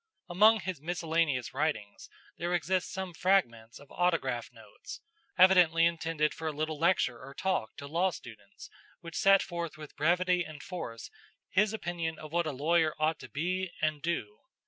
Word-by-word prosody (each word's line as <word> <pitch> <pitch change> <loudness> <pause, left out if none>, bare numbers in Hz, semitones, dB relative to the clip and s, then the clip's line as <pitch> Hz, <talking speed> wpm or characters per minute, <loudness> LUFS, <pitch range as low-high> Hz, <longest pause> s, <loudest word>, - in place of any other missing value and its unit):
Among 215 +5 +5
his 185 -6 -5
miscellaneous 160 -6 -1
writings 130 -8 -3 0.3
there 175 +1 0
exist 180 +2 -1
some 190 -1 -5
fragments 140 -12 +1
of 145 -1 -16
autograph 160 -10 0
notes, 110 -3 -11 0.4
evidently 180 -3 +6
intended 165 -2 0
for 160 - -5
a - - 0
little 155 0 -3
lecture 165 -8 +2
or 135 +1 -11
talk 185 -12 -1
to 140 - -8
law 170 +6 +1
students 110 - -11 0.3
which 170 -1 -9
set 195 0 +5
forth 170 -3 -5
with 155 -1 -11
brevity 180 +3 +2
and 155 -3 -10
force 115 -11 -7 0.4
his 210 +2 +3
opinion 175 -6 -3
of 155 -1 -10
what 170 0 0
a - - -1
lawyer 155 +3 +1
ought 155 +1 0
to - - -10
be 185 +5 -2
and 155 -1 -1
do. 115 -11 -3
165 Hz, 165 wpm, -30 LUFS, 145-180 Hz, 0.4 s, evidently